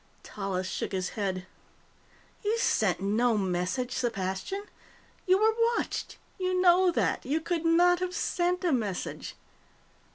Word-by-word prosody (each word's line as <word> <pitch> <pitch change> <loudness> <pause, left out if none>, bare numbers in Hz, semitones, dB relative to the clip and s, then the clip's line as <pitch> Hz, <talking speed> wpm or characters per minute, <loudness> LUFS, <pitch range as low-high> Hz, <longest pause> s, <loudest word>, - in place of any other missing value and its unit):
Tallis 190 -2 -3
shook - - -4
his 185 -1 -1
head. 190 -3 -3 1.0
"You 425 +2 +1
sent 195 - +1
no 220 +4 +2
message, 190 +6 -1
Sepastian. 220 - -2 0.6
You 370 +1 +5
were 440 +2 +3 0.2
watched. - - -3 0.2
You 370 0 0
know 365 0 +5
that. 340 - 0
You 290 +5 0
could 335 0 -2
not 350 +2 +5
have 360 0 -3
sent 360 +1 0
a 350 - +2
message." 210 -8 -3
255 Hz, 130 wpm, -28 LUFS, -, 1.0 s, You